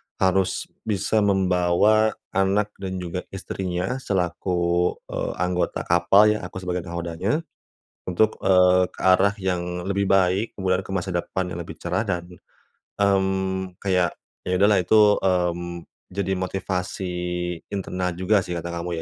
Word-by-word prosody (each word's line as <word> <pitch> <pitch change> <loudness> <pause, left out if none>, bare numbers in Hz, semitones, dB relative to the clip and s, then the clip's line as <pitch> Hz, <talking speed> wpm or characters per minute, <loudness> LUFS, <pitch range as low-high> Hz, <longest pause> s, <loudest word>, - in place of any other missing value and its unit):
harus 95 0 +1 0.2
bisa 110 +1 +1
membawa 95 +2 +3 0.2
anak 100 +2 +1
dan 95 -1 -4
juga 90 +1 -3 0.2
istrinya 95 +5 -3
selaku, 90 -4 0 0.2
eee, - - -3
anggota 90 0 -1
kapal 85 +5 +5
ya, 105 - -1
aku 95 +1 -7
sebagai 90 -1 -3
nakhodanya 85 - -2 0.7
untuk, 110 +5 +1
eee, 90 -1 +4
ke - - -21
arah 95 +2 +5
yang 90 -2 -2
lebih 100 0 0
baik, 95 +3 +2
kemudian 95 -1 +1
ke 95 - -12
masa 95 -1 -2
depan 90 +1 -2
yang 85 - -4
lebih - - -10
cerah, - - -1
dan, 90 -5 -2 0.7
mmm, 95 -2 0
kayak, 90 -4 +1 0.3
ya 90 - +1
udahlah 100 +1 +4
itu, 90 +5 +4 0.2
mmm, 85 -2 -1 0.3
jadi 95 0 -1
motivasi 95 0 -3 0.6
internal 90 -2 -2
juga 95 +5 +2
sih, 90 - -4
kata 85 0 -4
kamu 85 -1 -4
95 Hz, 135 wpm, -24 LUFS, 90-95 Hz, 0.7 s, kapal